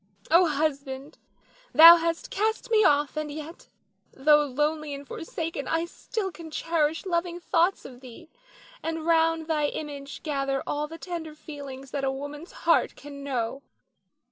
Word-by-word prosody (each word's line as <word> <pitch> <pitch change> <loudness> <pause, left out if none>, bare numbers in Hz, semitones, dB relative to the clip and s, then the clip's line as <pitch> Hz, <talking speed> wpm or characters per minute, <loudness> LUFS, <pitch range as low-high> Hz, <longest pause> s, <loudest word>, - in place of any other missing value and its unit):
Oh, 345 +2 +6
husband, 280 -1 -2 0.5
thou 335 +2 +11
hast 335 0 -2
cast 440 +3 -1
me 435 -1 +5
off; 290 -3 +3
and 305 -1 -3
yet, 310 +3 -9 0.4
though 295 +2 +4
lonely 300 +2 -1
and 280 0 -10
forsaken, 325 -3 -5
I 330 +1 0
still 390 +3 -4
can 335 -2 -10
cherish 320 0 0
loving 345 -1 -1
thoughts 350 +2 +1
of 250 -2 -11
thee, 260 +6 -12 0.5
and 325 -1 -4
round 325 -1 +3
thy 305 -2 +1
image 285 -2 -6
gather 275 -3 -1
all 295 +1 -2
the 325 +2 -9
tender 330 -3 -6
feelings 275 -4 -9
that 280 -1 -3
a 270 - +2
woman's 290 +4 -7
heart - - +3
can 280 -1 -10
know. 260 -1 -2
305 Hz, 150 wpm, -26 LUFS, 280-330 Hz, 0.5 s, thou